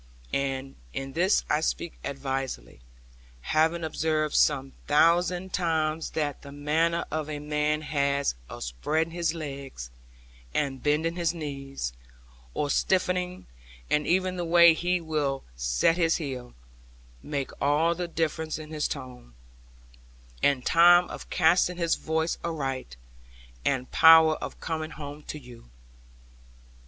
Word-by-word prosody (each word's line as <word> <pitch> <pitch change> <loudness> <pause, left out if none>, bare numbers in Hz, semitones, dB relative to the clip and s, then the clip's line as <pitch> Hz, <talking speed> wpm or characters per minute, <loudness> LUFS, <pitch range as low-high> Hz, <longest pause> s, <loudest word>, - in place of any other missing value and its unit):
And 135 -1 -2 0.2
in 135 0 -5
this 180 +6 +2
I 150 - +1
speak 170 +1 -2
advisedly; 135 - -4 0.6
having 160 - +1
observed 155 -1 0
some 135 -2 +2
thousand 175 +4 +3
times 160 -2 0
that 145 -3 -1
the 140 - -11
manner 160 +4 0
a 155 -1 -3
man 150 +1 -1
has 140 - 0 0.2
of - - -7
spreading 155 - -1
his 170 -1 -1
legs, 135 - -7 0.6
and 135 -3 -1
bending 160 +3 +1
his 170 0 0
knees, 135 - -5 0.6
or 145 -1 0
stiffening, 180 -1 0 0.5
and 150 0 +2
even 185 +1 +1
the 175 - -2
way 170 0 +7
he 180 +2 0
will 150 -4 -2
set - - +2
his 165 -2 +3
heel, 130 -6 -5 0.7
make 140 -3 -3
all 150 +4 +3
the 175 +1 -4
difference 160 -1 -2
in 155 0 -9
his 150 -1 -1
tone, 125 - -8 1.1
and 135 -3 +2
time 175 +1 +6
of - - -8
casting 175 +1 +3
his 170 -2 +1
voice 160 +1 -1
aright, 135 - -3 0.7
and 130 -2 -1
power 160 -1 +8
of - - -7
coming 160 -1 -3
home 145 -2 -8
to - - -5
you. 120 - -14
155 Hz, 125 wpm, -27 LUFS, 140-165 Hz, 1.1 s, power